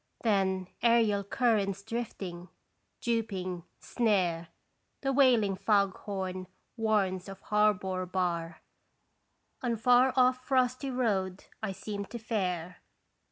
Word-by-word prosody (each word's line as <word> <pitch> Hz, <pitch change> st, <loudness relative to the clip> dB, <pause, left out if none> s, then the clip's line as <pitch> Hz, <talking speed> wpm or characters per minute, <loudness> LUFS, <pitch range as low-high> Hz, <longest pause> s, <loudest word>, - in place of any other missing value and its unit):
Then 190 Hz, -4 st, +1 dB
aerial 225 Hz, -4 st, +3 dB
currents 200 Hz, -3 st, +1 dB
drifting, 195 Hz, -6 st, -5 dB, 0.5 s
duping, 190 Hz, -7 st, -2 dB
snare, 185 Hz, -8 st, 0 dB, 0.5 s
The 270 Hz, -1 st, 0 dB
wailing 240 Hz, -8 st, +4 dB
fog 200 Hz, -1 st, +2 dB
horn 185 Hz, -2 st, -5 dB, 0.3 s
warns 205 Hz, -5 st, 0 dB
of 195 Hz, -1 st, -9 dB
harbor 190 Hz, -3 st, +1 dB
bar, 170 Hz, -3 st, -2 dB, 1.0 s
On 240 Hz, -2 st, 0 dB
far 250 Hz, +3 st, +5 dB
off 255 Hz, 0 st, +3 dB
frosty 255 Hz, 0 st, +1 dB
road 200 Hz, -7 st, -1 dB, 0.2 s
I 220 Hz, -3 st, -2 dB
seem 200 Hz, +1 st, -5 dB
to 235 Hz, -, -7 dB
fare. 180 Hz, -6 st, -2 dB
200 Hz, 105 wpm, -30 LUFS, 185-235 Hz, 1.0 s, far